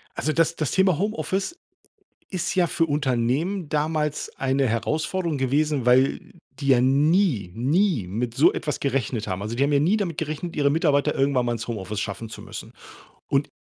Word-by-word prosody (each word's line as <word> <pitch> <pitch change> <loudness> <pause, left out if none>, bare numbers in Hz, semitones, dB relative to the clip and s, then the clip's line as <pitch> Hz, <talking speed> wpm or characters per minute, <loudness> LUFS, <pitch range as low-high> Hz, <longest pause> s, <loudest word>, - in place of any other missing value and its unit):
Also, 155 - -1
das 165 +1 +1
das 155 -4 -1
Thema 190 -4 +3
Homeoffice 205 - -2 0.7
ist 185 -3 -2
ja 180 -2 +3
für 165 - +1
Unternehmen 145 +5 0
damals 150 0 -1
eine 135 0 +1
Herausforderung 155 - -1
gewesen, 140 0 0
weil 130 +2 +3 0.3
die 140 - -4
ja 125 -2 +5
nie, 140 - +2
nie 145 - +1
mit 115 +5 -3
so 145 - +5
etwas 150 -1 -3
gerechnet 130 -5 -1
haben. 95 0 -3
Also, 110 +3 -4
die 135 - +2
haben 145 - +1
ja 140 - +4
nie 175 +9 +3
damit 175 -7 -3
gerechnet, 160 +2 -4
ihre 145 -1 +2
Mitarbeiter 145 -2 +2
irgendwann 135 -2 +2
mal 120 - 0
ins 115 0 -5
Homeoffice 105 -2 -4
schaffen 110 +2 -5
zu 110 - -9
müssen, - - -9 0.6
und 140 +1 +1
145 Hz, 175 wpm, -24 LUFS, 125-165 Hz, 0.7 s, ja